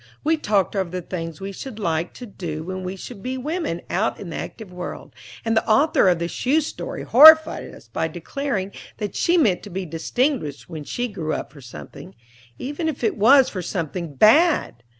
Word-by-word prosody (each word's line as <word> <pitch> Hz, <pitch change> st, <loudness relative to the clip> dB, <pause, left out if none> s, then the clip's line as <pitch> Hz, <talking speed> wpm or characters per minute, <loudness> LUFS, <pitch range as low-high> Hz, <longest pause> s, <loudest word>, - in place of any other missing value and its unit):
We 320 Hz, +2 st, +3 dB
talked 210 Hz, -, 0 dB
over 190 Hz, -3 st, -1 dB
the 180 Hz, 0 st, -5 dB
things 165 Hz, -3 st, -6 dB
we 195 Hz, +1 st, -5 dB
should 220 Hz, +3 st, -8 dB
like 170 Hz, -4 st, -2 dB
to 250 Hz, -, -8 dB
do 165 Hz, -7 st, -6 dB
when 185 Hz, +2 st, -5 dB
we 185 Hz, +1 st, -4 dB
should 200 Hz, +2 st, -9 dB
be 255 Hz, +3 st, -4 dB
women 300 Hz, -, -3 dB
out 210 Hz, +5 st, -1 dB
in 180 Hz, -4 st, -7 dB
the -, -, -5 dB
active 210 Hz, -5 st, -7 dB
world; 180 Hz, 0 st, -7 dB, 0.3 s
and 225 Hz, 0 st, +1 dB
the 220 Hz, -, +1 dB
author 275 Hz, -3 st, +4 dB
of 175 Hz, -, +3 dB
the 170 Hz, 0 st, -2 dB
shoe 275 Hz, -, +1 dB
story 300 Hz, -, -6 dB
horrified 315 Hz, +5 st, +7 dB
us -, -, -15 dB
by -, -, -2 dB
declaring 255 Hz, -9 st, -4 dB, 0.3 s
that 205 Hz, -1 st, -4 dB
she 345 Hz, +1 st, +2 dB
meant 215 Hz, -, +3 dB
to 205 Hz, -, -10 dB
be 190 Hz, 0 st, -4 dB
distinguished 165 Hz, -, -2 dB
when 155 Hz, -4 st, -7 dB
she 245 Hz, +9 st, -2 dB
grew 170 Hz, -8 st, -4 dB
up -, -, -5 dB
for 145 Hz, -, -13 dB
something, 115 Hz, -5 st, -11 dB, 0.4 s
even 295 Hz, -, -3 dB
if 280 Hz, -5 st, -6 dB
it 220 Hz, -, +1 dB
was 260 Hz, +6 st, +6 dB
for 185 Hz, -, -5 dB
something 170 Hz, -3 st, -4 dB
bad! 285 Hz, -, +4 dB
200 Hz, 200 wpm, -22 LUFS, 175-260 Hz, 0.4 s, horrified